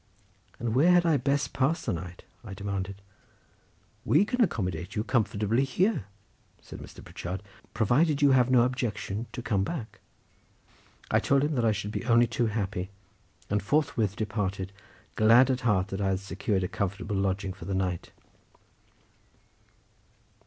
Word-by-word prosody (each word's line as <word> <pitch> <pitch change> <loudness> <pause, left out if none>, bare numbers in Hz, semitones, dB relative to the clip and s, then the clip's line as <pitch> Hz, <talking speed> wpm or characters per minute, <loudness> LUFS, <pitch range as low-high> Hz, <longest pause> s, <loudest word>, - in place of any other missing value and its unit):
"And 115 -1 -2
where 160 +8 +5
had 175 -1 +4
I 160 -3 +4
best 140 +2 0
pass 140 +5 0
the 115 - 0
night?" 90 +1 -7 0.2
I 105 -4 -8
demanded. 100 0 -4 1.0
"We 165 +8 +4
can 250 +3 -1
accommodate 90 - -1
you 105 - 0
comfortably 110 0 +1
here," 175 - +1 0.5
said - - -11
Mr. - - -11
Pritchard, 90 +3 -6 0.3
"provided 140 +8 +2
you 145 -1 +5
have 130 -1 +4
no 125 -2 +5
objection 115 -4 -2
to 120 - -6
come 105 -5 +1
back." 120 - -5 1.1
I - - +4
told 140 0 +2
him 150 +1 0
that 120 -4 +1
I 110 - +4
should 105 0 -3
be - - -3
only 120 -1 +5
too 115 +1 0
happy, 100 -3 -3 0.6
and 105 0 0
forthwith 110 -4 0
departed, 100 -3 -3 0.4
glad 115 +4 +6
at 130 - -1
heart 100 -5 +1
that 95 +1 -4
I 100 - +1
had 95 -1 0
secured 95 0 -2
a - - 0
comfortable 100 +2 -3
lodging 95 0 -1
for 95 - -11
the 95 - -2
night. 90 -2 -2
110 Hz, 155 wpm, -28 LUFS, 95-130 Hz, 1.1 s, glad